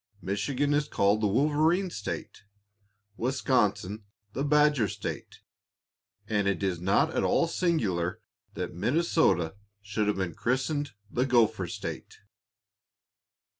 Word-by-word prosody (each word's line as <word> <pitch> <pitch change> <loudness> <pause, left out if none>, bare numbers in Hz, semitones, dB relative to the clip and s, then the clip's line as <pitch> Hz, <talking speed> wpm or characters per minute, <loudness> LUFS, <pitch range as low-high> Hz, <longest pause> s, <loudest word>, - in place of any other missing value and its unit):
Michigan 125 +10 -1
is 150 0 +1
called 100 -2 +2
the 105 - +3
"Wolverine 155 - +2
State," 100 -10 -6 0.8
Wisconsin 115 -5 0 0.3
the 135 - -2
"Badger 150 -5 +3
State," - - -6 0.9
and 105 -2 +1
it 100 -1 0
is 90 -3 -1
not 100 - +2
at - - +1
all 170 - +3
singular 110 - 0 0.4
that - - -4
Minnesota 100 - +2 0.3
should 105 +1 -2
have 105 - +1
been 95 -3 -2
christened 135 - -1 0.2
the 125 +2 0
"Gopher 120 -4 +3
State." - - -6
115 Hz, 115 wpm, -28 LUFS, 100-145 Hz, 0.9 s, the